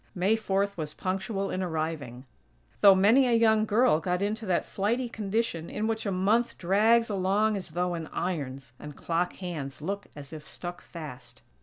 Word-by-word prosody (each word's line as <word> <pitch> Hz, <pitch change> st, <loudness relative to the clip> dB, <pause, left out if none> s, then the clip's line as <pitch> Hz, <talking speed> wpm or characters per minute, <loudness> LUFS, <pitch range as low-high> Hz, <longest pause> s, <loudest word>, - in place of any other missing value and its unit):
May 190 Hz, +4 st, +2 dB
Fourth 200 Hz, -2 st, 0 dB
was 155 Hz, -2 st, -5 dB
punctual 195 Hz, +1 st, -2 dB
in 185 Hz, -, -2 dB
arriving; 155 Hz, -7 st, -3 dB, 0.5 s
though 200 Hz, -1 st, +8 dB
many 225 Hz, +8 st, +5 dB
a 240 Hz, -, +2 dB
young 220 Hz, -1 st, +4 dB
girl 220 Hz, -6 st, +4 dB
got 180 Hz, +3 st, -1 dB
into 215 Hz, +1 st, -2 dB
that 180 Hz, -, +1 dB
flighty 235 Hz, +6 st, -1 dB
condition 210 Hz, -6 st, -2 dB
in 215 Hz, -, -2 dB
which 225 Hz, -1 st, -2 dB
a -, -, 0 dB
month 210 Hz, +6 st, +1 dB
drags 220 Hz, +6 st, +3 dB
along 205 Hz, +2 st, +1 dB
as 190 Hz, -3 st, -5 dB
though 180 Hz, +1 st, 0 dB
in 165 Hz, -2 st, -4 dB
irons, 135 Hz, -7 st, -4 dB
and 150 Hz, -1 st, -9 dB
clock 175 Hz, +1 st, -1 dB
hands 155 Hz, -7 st, -6 dB
look 200 Hz, +6 st, -4 dB
as 145 Hz, +1 st, -10 dB
if 155 Hz, -1 st, -8 dB
stuck 175 Hz, 0 st, -7 dB
fast. 145 Hz, -7 st, -10 dB
190 Hz, 175 wpm, -28 LUFS, 165-215 Hz, 0.5 s, though